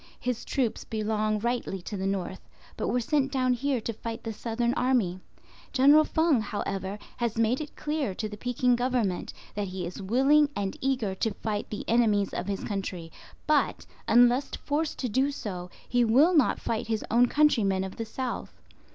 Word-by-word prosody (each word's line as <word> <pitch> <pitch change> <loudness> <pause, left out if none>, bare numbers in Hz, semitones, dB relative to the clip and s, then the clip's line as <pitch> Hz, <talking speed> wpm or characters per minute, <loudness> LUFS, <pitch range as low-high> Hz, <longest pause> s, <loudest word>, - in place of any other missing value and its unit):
His 245 -2 -2
troops 255 -6 -1
belong 215 -1 -1
rightly 235 -3 -2
to 210 - -5
the 190 0 -2
north, 190 -1 -4 0.3
but - - -2
were 250 - +1
sent 275 +2 +1
down 255 -2 +2
here 265 +1 0
to 230 - -3
fight 225 +1 -6
the 225 - -4
Southern 235 +2 -1
Army. 230 -9 +1 0.5
General 290 +3 +6
Feng, 315 -7 +2
however, 195 -2 -3 0.2
has 235 -2 -1
made 230 +5 +2
it 295 - -8
clear 295 -10 -2
to 215 - -3
the 210 - -7
Peking 245 +2 +1
Government 240 -7 -1 0.2
that 205 -1 -2
he 185 -1 -4
is 180 +4 -6
willing 270 +9 +4
and 195 -1 -2
eager 255 -7 0
to 200 +2 -2
fight 210 -1 -3
the 210 - -5
enemies 215 -4 +2
of 180 - -3
his 200 -1 -3
country; 185 -5 -4 0.3
but, 300 -1 +1 0.2
unless 245 +3 +5
forced 300 +2 -2
to 255 - -2
do 260 +5 +2
so, 185 -10 -5 0.2
he 245 0 +2
will 270 +10 +5
not 295 -5 +3
fight 225 -2 -2
his 220 -1 -1
own 240 +2 +5
countrymen 220 -11 +3
of 190 0 -7
the 225 - -3
south. 250 +3 -5
230 Hz, 180 wpm, -28 LUFS, 205-260 Hz, 0.5 s, General